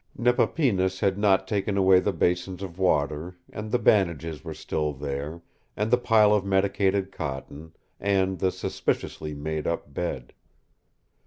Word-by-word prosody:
Nepapinas 115 - +1
had 95 -1 +2
not 95 -2 +2
taken 100 0 -1
away 95 -1 +6
the 100 - 0
basins 90 +2 -1
of 90 -1 -8
water, 80 0 0 0.2
and 105 +1 -5
the - - +3
bandages 85 - +1
were - - -6
still 75 -1 -2
there, 70 +4 -5 0.3
and 105 +2 -1
the 125 - +6
pile 110 -3 +5
of 105 -2 +2
medicated 95 0 +1
cotton, 70 +2 -6 0.2
and 95 -2 +1
the 95 +1 +2
suspiciously 80 -4 -3
made 75 +1 -3
up 85 -4 -3
bed. 70 -7 -4
95 Hz, 145 wpm, -26 LUFS, 80-100 Hz, 0.3 s, away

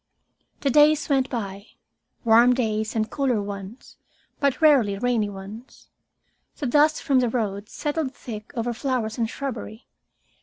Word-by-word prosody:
The 275 - +1
days 300 +2 +4
went 270 -2 +2
by, 200 -3 -5 0.6
warm 235 +2 +6
days 220 -3 -1
and 220 -1 0
cooler 260 -5 0
ones, 200 +3 -8 0.4
but 280 -3 +1
rarely 265 -11 +4
rainy 230 -2 0
ones. 200 +5 -11 0.7
The 290 - -4
dust 295 +4 +3
from 275 -4 +3
the 245 -2 +1
road 210 -3 -3
settled 295 -3 -3
thick 215 -3 -8
over 235 +1 -1
flowers 240 -2 -2
and 225 -1 0
shrubbery. 235 -3 -6
240 Hz, 140 wpm, -24 LUFS, 215-270 Hz, 0.7 s, warm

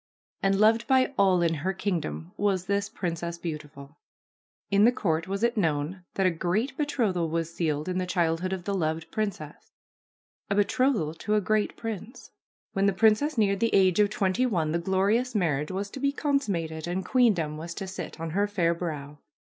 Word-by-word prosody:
And 195 0 +2
loved 225 +2 +4
by 260 +1 +3
all 185 -5 +4
in 165 -1 +2
her 190 +4 0
kingdom 155 - -3
was 195 -3 0
this 200 +1 0
Princess 170 -4 -4
Beautiful. 150 -3 -8 0.7
In 200 +1 +5
the 235 - +7
court 165 -9 -1
was 195 +3 -3
it 235 0 +2
known 165 0 -1
that 195 - +1
a 185 - +4
great 185 - -1
betrothal 225 - 0
was 165 0 -2
sealed 155 -2 -1
in 185 0 -1
the 180 - -2
childhood 175 0 0
of 190 -2 -3
the 200 - -2
loved 160 -3 -2
princess 195 -9 -4 0.4
— - - -56
a 200 - +1
betrothal 205 - +2
to 210 +6 -1
a - - +4
great 210 +1 0
prince. 225 +1 -7 0.4
When 195 +1 +2
the 200 - +2
princess 225 +9 +3
neared 200 -3 +2
the 230 +1 +2
age 190 -1 +4
of 205 -1 +5
twenty 210 +4 +1
one 165 -9 0
the 170 - 0
glorious 200 +8 +1
marriage 150 -7 0
was 195 +2 -4
to - - -7
be 280 +1 +1
consummated 195 - -1
and 180 +2 -2
queendom 185 - +2
was 170 +2 -6
to 195 - -4
sit 185 -4 -7
on 165 0 -4
her 200 +4 +1
fair 175 -5 +1
brow. 150 -4 -5
190 Hz, 190 wpm, -27 LUFS, 165-210 Hz, 0.7 s, the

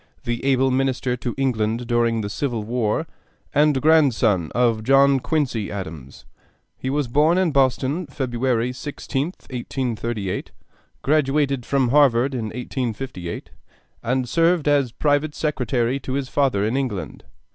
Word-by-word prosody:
the 120 0 -3
able 135 -1 +3
Minister 130 -1 0
to 120 -1 -4
England 120 -3 0
during 115 -1 +1
the 100 - -3
Civil 115 0 -2
War, 115 +6 -1 0.5
and 145 -1 +3
grandson 125 - +3
of 115 -2 +2
John 135 +2 +5
Quincy 125 -6 -1
Adams. 80 -9 -8 0.5
He 130 - -4
was 145 -1 0
born 150 +8 +3
in 185 -3 +2
Boston, 140 +4 +1
February 125 -2 -1
16th, 145 +4 -4
1838, 120 -5 -3 0.5
graduated 140 -3 +1
from 135 -3 +2
Harvard 135 -2 +4
in 120 -4 -2
1858, 120 -5 -5 0.5
and 125 +2 -1
served 165 +1 +2
as 140 -4 +3
private 145 +3 0
secretary 130 -4 0
to 130 -1 -5
his 135 -1 -2
father 130 -9 +1
in 110 +4 -1
England. 105 - -3
130 Hz, 130 wpm, -22 LUFS, 115-140 Hz, 0.5 s, John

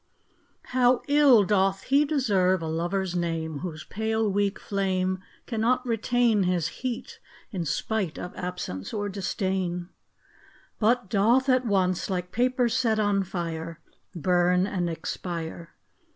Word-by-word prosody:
HOW 250 -1 +4
ill 285 -6 +6
doth 195 +2 +1
lie 280 +2 +6
deserve 195 - +2
a - - -3
Lover's 175 +3 -1
name 165 -3 -2
Whose 160 -2 -6
pale 220 +1 -1
weak 200 0 0
flame 185 -2 -1 0.3
Cannot 245 +2 0
retain 235 -1 +2
His 180 -3 +1
heat, 250 -2 -4 0.3
in 180 -5 -3
spite 190 +3 -2
of 180 - -7
absence 180 - -5
or 205 -1 -2
disdain; 185 -2 -2 0.9
But 235 0 +2
doth 235 +6 +3
at 255 -1 +3
once, 185 -3 +1
like 180 -1 -3
paper 250 +1 +2
set 230 -2 +1
on 205 -2 +2
fire, 165 -3 -5 0.4
Burn 180 +1 +2
and 180 -4 -1
expire 165 0 -5
195 Hz, 125 wpm, -26 LUFS, 175-225 Hz, 0.9 s, ill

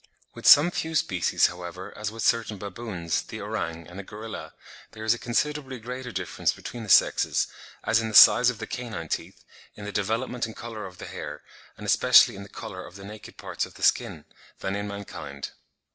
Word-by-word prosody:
With - - -4
some 155 +5 +9
few 160 -2 -3
species, 90 - +2
however, 90 +1 -5
as 105 0 -3
with 115 0 -5
certain 115 -3 +1
baboons, 95 -4 -3
the - - -8
orang 80 0 -4
and 90 +3 -10
the - - -5
gorilla, 110 +2 -8 0.4
there 110 0 -8
is 110 +1 +4
a 120 - -6
considerably 135 +2 -1
greater 125 +2 -6
difference 95 -3 -1
between 120 - -8
the 110 - -8
sexes, - - +4 0.4
as 110 +1 +3
in 115 - -2
the 110 - -4
size 125 - +9
of 125 - -3
the - - -5
canine 110 -10 -5
teeth, - - -4 0.3
in 105 - -9
the 105 - -4
development 115 +4 -1
and 110 - -10
colour 110 -4 -6
of 90 -1 -13
the - - -8
hair, 75 +1 -7 0.3
and - - -8
especially - - +6
in 95 - -8
the 100 - -10
colour 90 0 -7
of 90 - -12
the 100 0 -10
naked 105 +1 -11
parts - - -3
of - - -7
the - - -9
skin, - - +2 0.4
than 95 - -2
in 100 0 -3
mankind. 75 -9 -7
105 Hz, 205 wpm, -26 LUFS, 95-115 Hz, 0.4 s, some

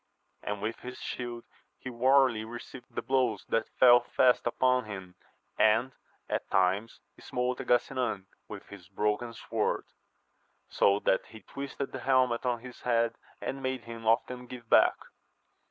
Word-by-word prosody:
And 105 0 -4
with 110 +2 -3
his 125 +1 -8
shield 120 -1 -5 0.3
he 130 - -7
warily 130 -2 +3
received 120 +2 -9
the - - -2
blows 125 -6 +1
that 115 - 0
fell 120 -1 +8
fast 125 0 +2
upon 125 +1 +2
him, 95 -4 -8 0.5
and 110 +5 +4 0.4
at - - -3
times 95 +4 +1 0.2
smote 125 +1 -2
at 130 - -9
Gasinan 120 -5 +1 0.2
with - - -9
his 95 -3 -12
broken 105 +4 -1
sword, - - -1 0.8
so 100 0 +3
that 95 - +1
he 110 - -13
twisted 140 0 -6
the 130 - -5
helmet 130 -1 +2
on 120 -2 0
his 125 0 -11
head, 115 -1 +1 0.3
and 135 - -4
made 130 -2 -2
hiTn 115 -1 -9
often 125 +2 +1
give 120 -2 -10
back. - - +5
120 Hz, 150 wpm, -30 LUFS, 110-125 Hz, 0.8 s, fell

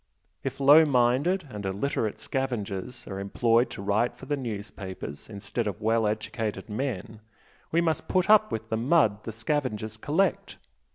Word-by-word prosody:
If 135 0 -4
low 145 +4 +8
minded 140 +7 +2
and 105 -1 -6
illiterate 105 +3 -1
scavengers 120 -5 -3
are 95 -1 -5
employed 115 +4 +2
to 100 - -7
write 105 +4 +1
for - - -10
the 145 - 0
newspapers 100 - -6
instead 105 +2 -3
of 105 +1 -3
well 110 0 +2
educated 110 -1 -3
men, 110 -2 -4 0.5
we 170 - +3
must 160 -3 0
put 185 -1 +2
up 215 0 +6
with 110 0 -4
the 110 - 0
mud 125 -4 +3
the 115 - -4
scavengers 110 -2 -2
collect. 160 - 0
115 Hz, 155 wpm, -27 LUFS, 105-140 Hz, 0.5 s, low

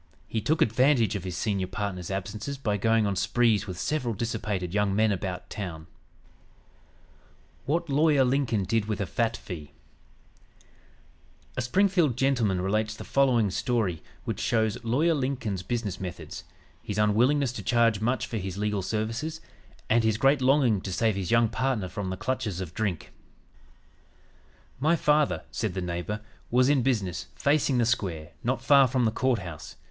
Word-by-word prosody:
He 110 - -2
took 155 +9 +2
advantage 120 -1 +3
of 100 - -3
his 90 -2 -4
senior 100 -4 -1
partner's 95 -4 -4
absences 105 +8 -4
by 105 -6 -1
going 115 +2 +2
on 100 -1 0
sprees 105 +2 +2
with 90 -2 -6
several 125 +1 -1
dissipated 105 -5 -3
young 105 -1 +1
men 110 +1 +3
about 95 -2 -4
town. 85 -6 -6 1.8
WHAT 170 +4 0
LAWYER 145 -1 +4
LINCOLN 125 -5 +1
DID 105 +3 0
WITH 105 -2 -3
A 100 - 0
FAT 115 +4 -1
FEE 80 -6 -8 1.8
A - - -1
Springfield 170 - +2
gentleman 120 -9 +1
relates 110 +3 0
the - - -8
following 125 -7 +2
story 100 -8 -1 0.2
which - - -3
shows 110 -1 0
Lawyer 140 +9 +2
Lincoln's 130 - -2
business 105 -1 -3
methods, 90 -3 -7 0.4
his 105 - -5
unwillingness 120 +6 +3
to 125 - -6
charge 115 -3 +2
much 120 +4 0
for 115 - -4
his 95 -2 -4
legal 105 -1 -1
services; 115 - -3 0.5
and 115 +1 +3
his 110 -1 +2
great 135 +3 +3
longing 130 -6 +3
to 95 - -5
save 110 +3 +1
his 95 -3 -3
young 115 -1 +4
partner 115 -3 -1
from 95 +1 -4
the 95 - -4
clutches 110 -6 -2
of 90 -3 -6
drink: 100 -7 -3 1.7
"My 155 +5 +3
father," 150 -2 +2
said 105 -6 -2
the - - -1
neighbor, 90 +4 -3 0.3
"was 125 +2 +4
in 145 -3 +4
business, 105 -9 -1
facing 140 -2 +2
the 120 - +3
square, 90 -10 -1
not - - -1
far 140 -2 +6
from 125 0 +1
the 110 - +2
Court 130 +1 +1
House. 85 -6 -8
110 Hz, 160 wpm, -27 LUFS, 95-130 Hz, 1.8 s, far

